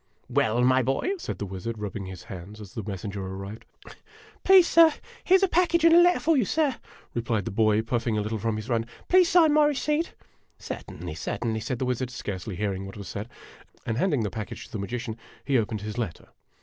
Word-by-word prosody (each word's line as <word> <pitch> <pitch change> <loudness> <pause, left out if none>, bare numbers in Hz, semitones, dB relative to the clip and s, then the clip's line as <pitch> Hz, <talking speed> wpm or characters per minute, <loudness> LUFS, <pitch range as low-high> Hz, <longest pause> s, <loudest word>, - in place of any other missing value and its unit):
"Well, 115 +3 +2
my 130 +1 +4
boy?" 135 - 0
said - - -5
the 105 - -4
wizard, 95 +4 -5
rubbing 105 -2 -5
his 95 +2 -9
hands, 100 -1 -9
as 100 -3 -11
the 110 - -4
messenger 100 0 -5
arrived. 95 +3 -7 0.4
" 435 0 -24
Please, 380 -2 +7
sir, 330 -1 +7 0.3
here 375 - +6
's 385 - -2
a - - +5
package 340 -1 +2
and 330 - +7
a 345 - +8
letter 355 +1 +4
for 325 0 +2
you, 260 - +3
sir," 285 +3 +1 0.4
replied 115 -4 -1
the - - -3
boy, 110 +1 +2
puffing 115 -1 -1
a - - +1
little 110 +1 -3
from 115 +1 -1
his 110 0 -5
run. 115 -2 0
" - - -25
Please 365 -1 +6
sign 330 -4 +5
my 305 0 +5
receipt." 295 +4 -1 0.3
" - - -41
Certainly, - - -7
certainly," 110 -2 -3
said 125 +3 -3
the 130 - -2
wizard, 125 0 -1
scarcely 105 -5 -5
hearing 95 -1 -2
what 95 - -10
was 100 -2 -8
said; 105 +5 -5 0.6
and 115 +1 -1
handing 145 -10 +1
the 105 - -2
package 110 +2 -6
to - - -18
the 110 - -4
magician, 115 +2 -4 0.3
he 135 -3 +3
opened 110 -1 -2
his 105 +3 -5
letter. 110 -8 -5
115 Hz, 225 wpm, -26 LUFS, -, 0.6 s, a